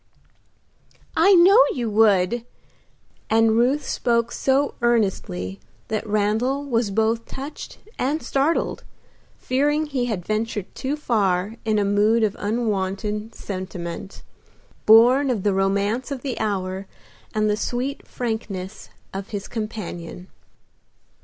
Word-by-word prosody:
"I 380 +5 +6
know 380 +7 +7
you 240 -3 -2
would!" 210 +1 +3 0.9
and 225 0 +4
Ruth 250 +6 +2
spoke 235 -1 0
so 275 +1 +1
earnestly 190 - 0 0.3
that 220 0 -2
Randal 215 +7 +1
was 235 -5 0
both 225 +3 0
touched 280 +3 -8 0.2
and 290 +5 0
startled, 280 +5 0 0.5
fearing 295 +4 +1
he 270 -5 -1
had 205 -8 -3
ventured 215 -2 -2
too 270 +3 -2
far 205 -7 0
in 215 -1 +2
a 205 - +2
mood 210 +3 +3
of 210 -2 +1
unwonted 210 0 -2
sentiment, 185 -1 -6 0.6
born 245 +6 +7
of 220 -7 -1
the 205 - +2
romance 200 +6 0
of 275 -3 -5
the 265 -4 -3
hour 190 -2 -2 0.5
and 215 0 +2
the 210 - +2
sweet 250 +5 -3
frankness 215 -5 -5 0.2
of 195 +1 -6
his 200 -2 -5
companion. 185 -5 -6
220 Hz, 120 wpm, -23 LUFS, 200-250 Hz, 0.9 s, know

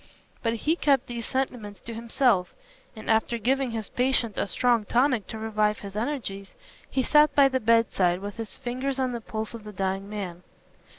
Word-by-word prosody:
But 230 -1 0
he 305 +8 +1
kept 275 -6 +2
these 240 -2 -5
sentiments 240 -7 -3
to 230 - -7
himself, 230 -4 +1 0.4
and 220 - -10
after 225 +2 +2
giving 260 +3 +1
his 225 -3 -4
patient 250 -4 +1
a - - -1
strong 240 +1 +2
tonic 245 0 +2
to 220 - -6
revive 215 -1 +1
his 200 0 -9
energies, 210 -5 -4 0.3
he 265 - 0
sat 300 +2 +5
by 280 -1 +7
the 260 -1 0
bedside 220 -6 +3
with 200 +2 -7
his 225 -4 -5
fingers 265 +2 -3
on 260 -1 +1
the 235 -1 -4
pulse 220 +1 -4
of 230 -2 -8
the 210 - -8
dying 195 0 -2
man. 190 -5 -5
230 Hz, 185 wpm, -26 LUFS, 210-255 Hz, 0.4 s, by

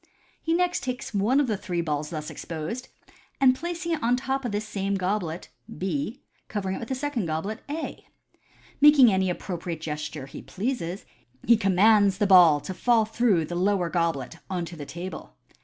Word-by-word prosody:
He 330 0 +1
next 360 0 +1
takes 255 -2 -4
one 215 +7 +2
of 290 - +3
the 220 -4 -1
three 175 -2 -3
balls 150 -2 -2
thus 155 -2 -5
exposed, 170 +10 -6 0.5
and 265 -2 +6
placing 340 +4 -4
it 320 - -1
on 240 +2 +3
the 250 - -5
top 270 0 -1
of 240 - -2
this 210 +1 -3
same 200 -1 -2
goblet 185 -3 -2 0.3
(B), 250 - -3 0.3
covering 190 -3 -3
it - - -6
with 230 - -7
a 265 - -1
second 260 - -2
goblet 160 +8 -3
(A). 315 +2 -5 0.7
Making 280 -7 +8
any 190 -1 +1
appro 180 0 -5
priate 170 -2 -5
gesture 150 -2 -5
he 135 - -9
pleases, 195 -4 -4 0.4
he 235 - +6
commands 200 0 +4
the 205 - +2
ball 175 -6 +7
to 190 - -5
fall 230 +3 +3
through 220 -7 +2
the 175 - -7
lower 180 -1 +1
goblet 165 -4 -1
on 180 -3 -2
to 170 +1 -9
the 145 -3 -8
table. 175 +1 -7
195 Hz, 190 wpm, -26 LUFS, 170-245 Hz, 0.7 s, Making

